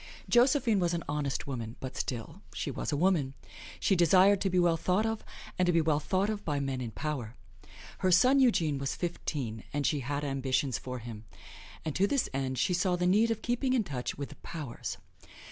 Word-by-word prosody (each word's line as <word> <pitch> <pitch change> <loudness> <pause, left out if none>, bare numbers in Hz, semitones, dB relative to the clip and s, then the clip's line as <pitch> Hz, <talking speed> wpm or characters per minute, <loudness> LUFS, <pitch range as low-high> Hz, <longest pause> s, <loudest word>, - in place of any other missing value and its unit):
Josephine 245 -3 +4
was 175 -1 +1
an 170 - -3
honest 145 -2 -2
woman, 115 -4 -5
but 130 0 -6
still, 120 -3 -4
she - - -2
was - - -3
a 145 - 0
woman. 155 -6 +2 0.4
She 195 - +3
desired 185 +3 +5
to 195 - +1
be 185 - 0
well 175 -2 +4
thought 185 +6 +1
of, 225 -1 -2 0.4
and 180 - +3
to - - +5
be 165 - +3
well 155 -2 +2
thought 190 +6 0
of 215 -1 -3
by 145 -3 -1
men 135 -2 -2
in 120 - -3
power. 125 0 -4 0.6
Her 185 - +2
son 250 +10 +5
Eugene 165 - +3
was 135 0 -2
fifteen, 135 - -4
and 145 -1 -1
she 150 - +2
had 140 +3 -3
ambitions 135 -1 0
for 125 0 -5
him; 115 -2 -8 0.6
and 155 - -3
to 195 - +3
this 275 +3 0
end 130 -1 -2
she 180 - +1
saw 180 +1 +2
the 180 0 -1
need 210 +6 +4
of 225 -1 -2
keeping 245 +2 0
in 245 -4 +3
touch 135 -9 -4
with 140 0 -5
the - - -11
Powers. 150 -8 -6
160 Hz, 210 wpm, -30 LUFS, 135-195 Hz, 0.6 s, desired